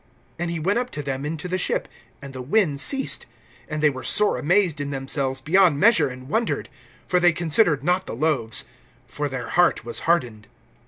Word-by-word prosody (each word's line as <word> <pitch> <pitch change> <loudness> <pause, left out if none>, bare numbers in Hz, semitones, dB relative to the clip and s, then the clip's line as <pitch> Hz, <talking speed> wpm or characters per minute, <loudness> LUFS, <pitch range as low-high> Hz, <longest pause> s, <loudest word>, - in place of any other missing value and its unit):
(51)And 175 0 -2
he 170 -1 -3
went 195 +8 0
up 250 0 -4
to 145 - -6
them 135 +1 -4
into 160 +3 -5
the 185 +1 -2
ship; - - -1 0.4
and 135 -1 -9
the 130 - -7
wind 150 - +1
ceased. 270 - +2 0.4
And 155 0 -4
they 150 - +6
were 130 -1 -8
sore 210 0 +3
amazed 175 -2 +1
in 140 - -4
themselves 135 -1 -3
beyond 170 0 +3
measure, 200 -8 +4
and 130 0 -10
wondered. 225 - -2 0.4
(52)For 180 -1 +1
they 175 0 +5
considered 165 -3 +2
not 180 +3 0
the - - -5
loaves; 130 -5 0 0.4
for 145 0 -4
their 135 -1 -6
heart 175 -8 +2
was 115 - -2
hardened. 120 -11 0
155 Hz, 195 wpm, -23 LUFS, 135-180 Hz, 0.4 s, they